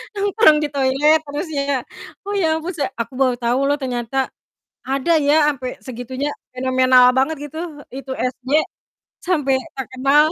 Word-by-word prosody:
Nongkrong 400 Hz, -5 st, +4 dB
di -, -, +1 dB
toilet 280 Hz, +3 st, +3 dB
terus 295 Hz, +5 st, -4 dB
ya. 280 Hz, -2 st, 0 dB, 0.4 s
Oh 405 Hz, -, -3 dB
ya 360 Hz, -5 st, +2 dB
ampun, 340 Hz, +4 st, -5 dB
se 290 Hz, -, 0 dB, 0.2 s
aku 230 Hz, +2 st, -6 dB
baru 255 Hz, -2 st, +3 dB
tau 240 Hz, +2 st, +1 dB
loh 290 Hz, +1 st, +2 dB
ternyata 245 Hz, -1 st, -3 dB, 0.7 s
ada 270 Hz, +5 st, 0 dB
ya 295 Hz, +1 st, +4 dB
sampai 255 Hz, -2 st, -5 dB, 0.2 s
segitunya, 255 Hz, +3 st, -4 dB, 0.3 s
fenomenal 255 Hz, 0 st, +4 dB
banget 270 Hz, +5 st, +1 dB
gitu. 315 Hz, -, -8 dB, 0.3 s
Itu 270 Hz, 0 st, -6 dB
SJ, 255 Hz, 0 st, -4 dB, 0.8 s
sampai 295 Hz, -7 st, +1 dB, 0.2 s
terkenal. 270 Hz, +3 st, +2 dB
270 Hz, 145 wpm, -20 LUFS, 255-300 Hz, 0.8 s, Nongkrong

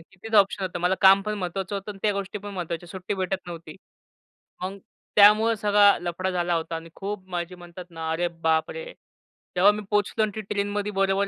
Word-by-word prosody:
की -, -, -20 dB
तेच 225 Hz, 0 st, -5 dB
ऑप्शन 195 Hz, 0 st, +3 dB
होतं. 180 Hz, -1 st, -3 dB
मला 180 Hz, +2 st, +2 dB
काम 195 Hz, +1 st, +7 dB
पण 210 Hz, +1 st, -2 dB
महत्वाचं 190 Hz, +2 st, -4 dB
होतं 200 Hz, +1 st, -5 dB
आणि 195 Hz, -, -9 dB
त्या 210 Hz, -, +2 dB
गोष्टी 200 Hz, 0 st, -4 dB
पण 205 Hz, 0 st, -8 dB
महत्वाच्या, 175 Hz, -1 st, -5 dB
सुट्टी 185 Hz, +3 st, -4 dB
भेटत 185 Hz, -1 st, -3 dB
नव्हती. 165 Hz, -3 st, -9 dB, 0.9 s
मग 190 Hz, +2 st, -4 dB, 0.4 s
त्यामुळे 215 Hz, +2 st, +6 dB
सगळा 205 Hz, 0 st, +5 dB
लफडा 175 Hz, +2 st, -3 dB
झाला 175 Hz, -1 st, 0 dB
होता 165 Hz, 0 st, -3 dB
आणि 165 Hz, 0 st, -7 dB
खूप 195 Hz, -1 st, -6 dB
माझी 175 Hz, 0 st, -4 dB
म्हणतात 175 Hz, 0 st, -11 dB
ना, 165 Hz, -1 st, -5 dB
अरे 175 Hz, +2 st, 0 dB
बापरे! 160 Hz, -, 0 dB, 0.6 s
तेव्हा 190 Hz, +3 st, +6 dB
मी 210 Hz, 0 st, -4 dB
पोहचलो 210 Hz, +1 st, +1 dB
आणि 215 Hz, -, 0 dB
ती 220 Hz, -, -3 dB
ट्रेनमध्ये 205 Hz, 0 st, -2 dB
बरोबर 195 Hz, 0 st, +1 dB
195 Hz, 195 wpm, -25 LUFS, 175-205 Hz, 0.9 s, काम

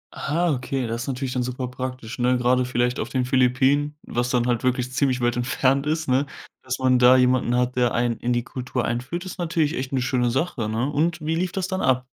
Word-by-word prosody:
Ah, 170 Hz, +4 st, 0 dB
okay, 130 Hz, -1 st, -2 dB
das 115 Hz, +1 st, -3 dB
ist -, -, -8 dB
natürlich 130 Hz, -1 st, -3 dB
dann 125 Hz, -, 0 dB
super 125 Hz, +1 st, -3 dB
praktisch, 125 Hz, -1 st, -6 dB
ne, 125 Hz, +1 st, +3 dB
grade 125 Hz, +1 st, +2 dB
vielleicht 125 Hz, 0 st, 0 dB
auf -, -, -3 dB
den 130 Hz, -2 st, 0 dB
Philippinen, 130 Hz, +3 st, +2 dB
was 120 Hz, +1 st, -2 dB
dann 120 Hz, -1 st, +1 dB
halt 120 Hz, -1 st, 0 dB
wirklich 125 Hz, 0 st, 0 dB
ziemlich 130 Hz, -2 st, +1 dB
weit 120 Hz, 0 st, +1 dB
entfernt 135 Hz, +3 st, +1 dB
ist, 155 Hz, +1 st, -1 dB
ne? 135 Hz, +2 st, +2 dB, 0.3 s
Dass 130 Hz, -1 st, -3 dB
man 130 Hz, -1 st, +3 dB
da 125 Hz, +1 st, +7 dB
jemanden 125 Hz, -1 st, +2 dB
hat, 125 Hz, 0 st, 0 dB
der 125 Hz, -2 st, +2 dB
einen 120 Hz, -1 st, 0 dB
in 125 Hz, -, -2 dB
die 120 Hz, 0 st, +1 dB
Kultur 125 Hz, 0 st, -4 dB
einführt, 135 Hz, +10 st, -3 dB
ist 185 Hz, -, -8 dB
natürlich 160 Hz, -3 st, 0 dB
echt 130 Hz, +1 st, -4 dB
'ne 130 Hz, -2 st, 0 dB
schöne 125 Hz, -2 st, +1 dB
Sache, 130 Hz, -3 st, -1 dB
ne? 115 Hz, +4 st, -1 dB
Und 160 Hz, +4 st, 0 dB
wie 160 Hz, -, 0 dB
lief 175 Hz, +2 st, -1 dB
das 190 Hz, -1 st, -2 dB
dann 190 Hz, 0 st, -2 dB
ab? 130 Hz, -1 st, +2 dB
130 Hz, 230 wpm, -23 LUFS, 125-140 Hz, 0.3 s, da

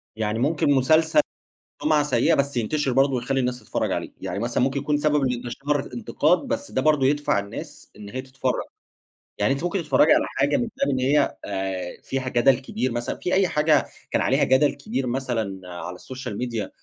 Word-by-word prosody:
يعني 110 Hz, 0 st, -1 dB
ممكن 145 Hz, +2 st, +2 dB
مسلسل 155 Hz, +4 st, +4 dB, 0.6 s
سمعة 150 Hz, -1 st, +3 dB
سيّئة 150 Hz, +2 st, +2 dB
بس 140 Hz, -2 st, 0 dB
ينتشِر 135 Hz, +5 st, 0 dB
برضه 135 Hz, +2 st, +3 dB
ويخلّي 130 Hz, +2 st, -1 dB
الناس 125 Hz, -1 st, -1 dB
تتفرّج -, -, -2 dB
عليه، -, -, -3 dB
يعني 95 Hz, -, -3 dB
مثلًا 120 Hz, +2 st, 0 dB
ممكن 135 Hz, +1 st, 0 dB
يكون 150 Hz, +1 st, 0 dB
سبب 150 Hz, -1 st, +2 dB
لإنتشار 130 Hz, +3 st, -1 dB
الإنتقاد 135 Hz, +7 st, +1 dB
بس 285 Hz, +2 st, -3 dB
ده 130 Hz, -, 0 dB
برضه 150 Hz, -2 st, +3 dB
يدفَع 145 Hz, -3 st, +2 dB
الناس 100 Hz, 0 st, -8 dB
إن 105 Hz, -1 st, -10 dB
هي 130 Hz, +5 st, -4 dB
تتفرّج، 130 Hz, -1 st, -2 dB, 0.8 s
يعني 135 Hz, -, +2 dB
أنتِ 140 Hz, +3 st, -5 dB
ممكن 175 Hz, +3 st, 0 dB
تتفرّجي 155 Hz, 0 st, +4 dB
على -, -, +3 dB
حاجة 145 Hz, +1 st, +1 dB
من 240 Hz, -, -1 dB
خِلال 275 Hz, -, +2 dB
إن 130 Hz, -, 0 dB
هي 140 Hz, +4 st, +2 dB
آآ، 95 Hz, -2 st, -4 dB
فيها 130 Hz, -1 st, -3 dB
جدَل 125 Hz, +1 st, +4 dB
كبير 130 Hz, -1 st, -3 dB
مثلًا 120 Hz, +1 st, -3 dB
في 180 Hz, -, -3 dB
أي 190 Hz, 0 st, +4 dB
حاجة 150 Hz, -2 st, +3 dB, 0.3 s
كان -, -, +1 dB
عليها -, -, +2 dB
جدل 135 Hz, +2 st, +4 dB
كبير 135 Hz, -, -3 dB
مثلًا 120 Hz, -7 st, -2 dB
على 90 Hz, +1 st, -7 dB
الSocial 130 Hz, +1 st, -7 dB
Media 115 Hz, -4 st, -3 dB
135 Hz, 190 wpm, -24 LUFS, 120-150 Hz, 0.8 s, مسلسل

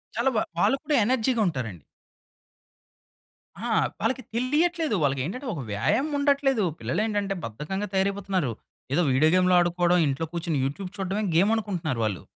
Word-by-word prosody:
చాలా 235 Hz, +4 st, +2 dB
వా -, -, +2 dB, 0.2 s
వాళ్ళు 270 Hz, -, +3 dB
కూడా 300 Hz, -, +1 dB
ఎనర్జీగుంటారండి. 205 Hz, -, 0 dB, 1.8 s
ఆ! -, -, -2 dB, 0.3 s
వాళ్ళకి 260 Hz, 0 st, 0 dB
తెలియట్లేదు. 305 Hz, +3 st, +1 dB
వాళ్ళకేంటంటే 145 Hz, -, -1 dB
ఒక 145 Hz, -, -5 dB
వ్యాయామముండట్లేదు. 275 Hz, -, +1 dB, 0.2 s
పిల్లలేంటంటే 205 Hz, -2 st, -1 dB
బద్ధకంగా 150 Hz, -, -4 dB
తయారైపోతున్నారు. 190 Hz, -6 st, 0 dB, 0.4 s
ఏదో 165 Hz, -, +3 dB
వీడియో 140 Hz, +5 st, +4 dB
గేమ్లు 185 Hz, 0 st, +4 dB
ఆడుకోడం 175 Hz, 0 st, +2 dB
ఇంట్లో 140 Hz, +4 st, -1 dB
కూర్చొని 165 Hz, -3 st, -1 dB
యూట్యూబ్ 180 Hz, +8 st, -4 dB
చూడ్డమే 195 Hz, +2 st, -2 dB
గేమ్ 195 Hz, +6 st, +4 dB
అనుకుంటున్నారు 175 Hz, -, -2 dB
వాళ్ళు. 105 Hz, -4 st, -2 dB
195 Hz, 120 wpm, -26 LUFS, 155-235 Hz, 1.8 s, వీడియో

